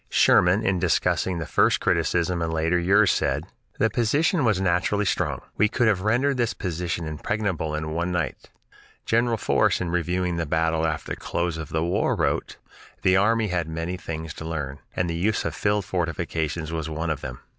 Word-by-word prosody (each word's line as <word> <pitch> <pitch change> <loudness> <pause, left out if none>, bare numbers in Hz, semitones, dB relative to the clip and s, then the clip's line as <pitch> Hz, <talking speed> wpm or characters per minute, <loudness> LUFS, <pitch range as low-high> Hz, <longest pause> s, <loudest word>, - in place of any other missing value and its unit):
Sherman, 90 +5 +4
in 95 -1 +1
discussing 90 +1 +1
the 80 - -3
first - - +3
criticism 85 0 +1
in 85 - -1
later 80 +2 +1
years, 100 +4 +4
said, - - 0 0.3
"The 115 - +3
position 145 - +2
was 105 -5 +2
naturally 95 +3 +1
strong;... - - -1 0.2
we 105 +1 +3
could 120 0 +1
have 100 -4 +2
rendered 125 +7 +1
this 120 -2 0
position 85 -2 -3
impregnable 80 -1 -2
in 80 0 -3
one 85 +3 -1
night." 85 -3 -3 0.6
General 115 0 +2
Force, - - +2
in 85 -2 -2
reviewing 90 0 -1
the 85 -2 -2
battle 80 +1 +1
after 75 -1 -4
the - - -3
close 85 -1 -2
of 80 -2 -6
the 80 0 -1
war, 85 - +1
wrote: - - -1 0.5
"The 95 - +4
army 110 +2 +2
had 90 -3 -1
many 80 +3 -3
things 80 -3 -6
to - - -8
learn, 75 -4 -4 0.2
and 90 - 0
the 85 - -2
use 100 +6 0
of - - -2
field 105 -1 0
fortifications 80 -3 -2
was 80 -1 -3
one 80 +1 -2
of 75 - -3
them." 65 -1 -6
85 Hz, 190 wpm, -24 LUFS, 80-100 Hz, 0.6 s, Sherman